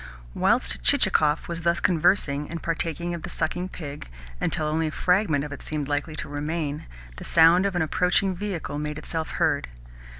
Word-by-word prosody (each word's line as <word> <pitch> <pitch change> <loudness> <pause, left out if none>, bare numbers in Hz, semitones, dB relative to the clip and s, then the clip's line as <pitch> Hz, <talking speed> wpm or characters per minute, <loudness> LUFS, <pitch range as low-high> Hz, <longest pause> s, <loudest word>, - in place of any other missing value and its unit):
Whilst - - +2
Chichikov 150 - +3
was 170 -1 -5
thus 170 +1 +1
conversing 155 -4 +2
and 165 0 -6
partaking 165 +1 -2
of 170 - -5
the - - -7
sucking 175 +3 -2
pig 145 - -8 0.3
until 155 - +1
only 155 +1 0
a - - -3
fragment 180 -5 +1
of 150 -1 -6
it - - -9
seemed 150 -2 -4
likely 145 +2 -2
to 140 - -5
remain, 150 0 -3 0.3
the - - -8
sound 170 +4 +5
of 195 - -4
an 175 - +2
approaching 180 +4 +2
vehicle 180 -6 -4
made 150 0 -4
itself 160 +1 -4
heard. - - +1
160 Hz, 175 wpm, -25 LUFS, 150-175 Hz, 0.3 s, sound